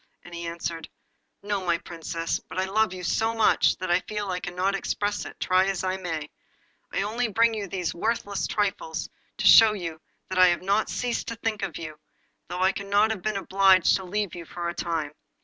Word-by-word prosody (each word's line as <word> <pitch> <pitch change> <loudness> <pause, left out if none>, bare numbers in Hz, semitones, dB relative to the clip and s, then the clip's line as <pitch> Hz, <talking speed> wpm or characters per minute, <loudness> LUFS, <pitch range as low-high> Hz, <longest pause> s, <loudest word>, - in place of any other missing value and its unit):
And 175 - -13
he 170 0 -5
answered 165 -1 -5 0.5
'No, 205 -2 -2
my 170 -2 +1
Princess; 165 0 -4
but - - -8
I 185 - +1
love 215 +2 +1
you 185 -1 -7
so 225 +5 0
much 225 -1 +3
that 185 -1 -3
I 175 - +4
feel 205 0 -4
I 180 - -2
cannot 180 +2 -1
express 205 +1 -2
it, - - -10
try 185 +1 +3
as 195 -2 -1
I 185 0 -1
may. 165 -5 -4 0.6
I - - 0
only 230 +4 -1
bring 230 +2 +3
you 210 -2 -4
these 180 -2 -3
worthless 205 +1 -1
trifles 195 -6 -2 0.3
to - - -2
show 220 -1 +9 0.6
that 185 -1 -1
I 185 - +8
have 175 0 +1
not 200 +3 +1
ceased 245 -1 -2
to 230 - -4
think 225 -2 -3
of 185 -5 -3
you, 155 -2 -8 0.5
though 180 +1 -4
I 190 +1 +4
have 205 +1 +1
been 215 +1 -1
obliged 190 -1 +4
to 190 - -8
leave 200 +1 -2
you 175 - -7
for 170 +1 -5
a - - -4
time. 165 -5 -2
190 Hz, 200 wpm, -26 LUFS, 175-210 Hz, 0.6 s, show